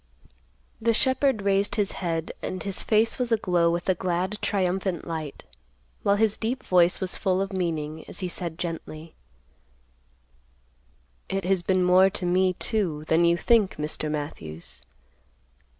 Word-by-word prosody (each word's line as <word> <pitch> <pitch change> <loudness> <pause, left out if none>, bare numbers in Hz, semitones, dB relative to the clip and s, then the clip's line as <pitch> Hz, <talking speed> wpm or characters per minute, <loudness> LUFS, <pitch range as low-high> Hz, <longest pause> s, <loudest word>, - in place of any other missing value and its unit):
The 230 0 +2
shepherd 260 -3 +2
raised 200 0 +2
his 205 -3 +1
head 165 -3 -3
and 185 - -4
his 195 -1 -1
face 225 +3 +2
was 245 -2 -1
aglow 180 -6 +2
with 170 +1 -2
a 190 - +4
glad 185 +3 -2
triumphant 190 -2 -1
light, 160 -4 -5 0.6
while 200 - +3
his 215 0 +2
deep 245 +4 -3
voice 180 -1 +3
was 185 -2 -1
full 190 -2 +1
of 195 +1 -2
meaning 160 -4 -3
as - - -8
he 185 - -1
said 170 -2 -4
gently, 165 -1 -6 2.2
"It 195 0 -2
has 190 -1 +2
been 185 +1 +1
more 185 +2 +6
to 190 -1 -5
me, 185 +1 +2
too, 180 -7 -2
than 165 +2 +4
you 170 0 +3
think, 220 -1 +3
Mr. 150 0 -3
Matthews. 115 - -6
185 Hz, 150 wpm, -26 LUFS, 170-200 Hz, 2.2 s, more